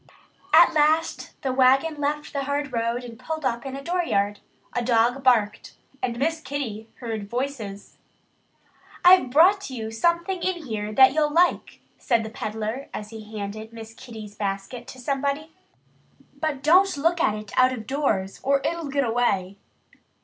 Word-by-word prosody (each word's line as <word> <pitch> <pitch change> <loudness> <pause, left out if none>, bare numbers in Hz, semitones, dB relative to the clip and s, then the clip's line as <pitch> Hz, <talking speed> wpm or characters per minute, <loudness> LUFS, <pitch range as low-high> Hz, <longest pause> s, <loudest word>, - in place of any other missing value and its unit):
At - - +7
last 310 +2 +1
the 265 -2 0
wagon 270 +4 +3
left 295 +1 -2
the 280 -1 -2
hard 285 -1 -2
road 230 +1 -1
and 230 -2 -10
pulled 315 -2 -5
up 235 +2 -1
in 270 - -5
a 275 - -7
dooryard. 240 - 0 0.3
A 245 - -1
dog 240 +2 +2
barked. 230 -5 +2 0.3
And 240 -2 -2
Miss 320 +5 -1
Kitty 230 -8 -5
heard 220 -4 -5
voices. 235 -6 -5 1.1
"I've 360 -7 +7
brought 365 +8 +4
you 225 -4 -5
something 340 +9 0
in 350 -4 -2
here 215 -3 -4
that 265 +4 +6
you'll 305 0 +2
like," 350 +3 +1 0.2
said 235 -3 +1
the 220 - -7
peddler 220 +4 -4
as 210 +1 -7
he 220 -1 -9
handed 215 +2 -6
Miss 225 -1 -10
Kitty's 220 -3 -10
basket 200 +4 -4
to 260 - -10
somebody. 280 +4 -2 0.9
"But 300 -4 -2
don't 365 +2 +4
look 330 +4 +1
at 215 - +2
it 210 -1 -9
out 255 0 +5
of 235 -4 -6
doors 215 -8 -1
or 275 +1 +2
it'll 335 -3 -2
get 280 0 +1
away." 200 -5 0
255 Hz, 160 wpm, -24 LUFS, 220-295 Hz, 1.1 s, At